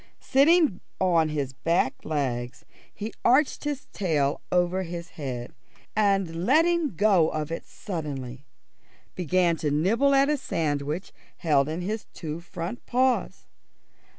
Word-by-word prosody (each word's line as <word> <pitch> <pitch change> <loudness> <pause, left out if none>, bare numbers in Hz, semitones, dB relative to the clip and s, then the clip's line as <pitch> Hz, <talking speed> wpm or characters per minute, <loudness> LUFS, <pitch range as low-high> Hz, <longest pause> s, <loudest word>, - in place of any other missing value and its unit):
Sitting 290 - +4 0.2
on 170 -4 +3
his 140 -3 -2
back 140 0 0
legs 130 -5 -3 0.3
he 215 +2 -6
arched 270 +4 +3
his 290 -2 -3
tail 150 -7 0
over 180 +1 +2
his 170 -1 -6
head, 125 -5 -6 0.4
and 195 -5 +1
letting 320 - +3
go 190 -5 +4
of 155 0 -3
it 165 - -5
suddenly, 140 - -6 0.7
began 175 -1 +1
to 150 - -1
nibble 220 - +3
at 275 +1 +5
a 300 0 +1
sandwich 150 - -2 0.3
held 145 -4 +2
in 160 +3 -3
his 210 +4 -4
two 160 -1 -5
front 175 +5 -6
paws. 255 +1 +1
175 Hz, 125 wpm, -26 LUFS, 150-215 Hz, 0.7 s, at